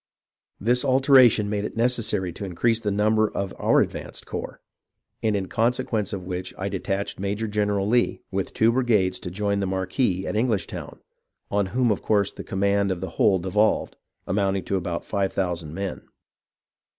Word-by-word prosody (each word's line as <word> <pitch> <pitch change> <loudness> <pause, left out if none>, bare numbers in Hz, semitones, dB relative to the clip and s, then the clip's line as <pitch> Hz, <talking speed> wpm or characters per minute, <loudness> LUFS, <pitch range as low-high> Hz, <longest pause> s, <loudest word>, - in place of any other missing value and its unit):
This 120 +5 +2
alteration 130 -5 +5
made 105 0 -1
it 105 - -5
necessary 115 -6 0
to - - -8
increase 110 +5 +1
the 110 -2 -2
number 110 +1 +2
of 100 -1 -4
our - - +4
advanced - - -4
corps, - - -6 0.6
and 110 -2 +1
in 95 -2 -2
consequence 115 -1 0
of 95 -3 -5
which 90 0 -5
I 95 +1 -2
detached 100 0 -3
Major 100 +3 -2
general 105 -1 0
Lee 120 +2 +1
with 95 0 -2
two 115 +1 +3
brigades 110 -7 +2
to 90 - -6
join 100 +2 -1
the 100 - -1
marquis 95 +1 0
at - - -3
English 110 -2 +1
town, - - -8 0.5
on 100 -1 +1
whom 120 +3 +1
of 100 - -1
course 100 -2 +2
the - - -9
command 100 +1 +1
of 95 -2 -2
the 95 -1 -5
whole 95 - +5
devolved, 95 +4 +1 0.3
amounting 95 0 0
to 100 - -2
about 85 -2 -3
five 100 -2 -1
thousand 85 -5 -2
men. 100 0 -4
100 Hz, 175 wpm, -24 LUFS, 95-110 Hz, 0.6 s, alteration